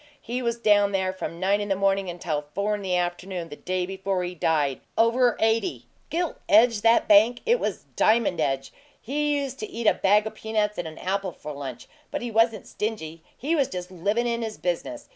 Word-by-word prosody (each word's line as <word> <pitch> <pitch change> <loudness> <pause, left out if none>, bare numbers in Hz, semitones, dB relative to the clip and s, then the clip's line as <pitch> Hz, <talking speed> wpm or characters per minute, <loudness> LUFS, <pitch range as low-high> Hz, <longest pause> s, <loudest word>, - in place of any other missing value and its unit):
He 245 +2 -4
was 235 -1 -1
down 205 -3 +3
there 190 -1 0
from 170 -2 -6
nine 200 +3 +2
in 205 - -4
the 195 - +2
morning 195 -1 +1
until 165 -4 -3
four 205 +1 0
in 205 - -3
the 185 -2 -1
afternoon 175 0 -2
the 145 - -8
day 185 +3 -2
before 190 0 -2
he 180 0 -4
died 150 -5 0 0.2
over 235 +1 +3
eighty! 225 +10 +1 0.2
Gilt 340 0 -1
edge, 225 0 +5
that 230 +1 +4
bank? 220 +4 +5
It 475 +2 +3
was - - -3
diamond 215 -6 +3
edge! 135 -1 -1 0.3
He 295 +3 0
used 270 -1 -5
to 215 - -5
eat 230 0 -5
a - - +6
bag 210 +2 +3
o' 220 - -3
peanuts 215 -2 -2
and 175 - -3
an 155 - -9
apple 190 0 -2
for 150 - -8
lunch; 140 -4 -7 0.2
but - - -4
he 240 - -4
wasn't 225 0 +2
stingy 165 -7 -4 0.2
he 305 +6 0
was 280 -5 +2
just 180 0 -6
livin' 200 +7 0
in 235 0 -1
his 220 -2 -4
business. 280 - -3
205 Hz, 210 wpm, -25 LUFS, 180-230 Hz, 0.3 s, a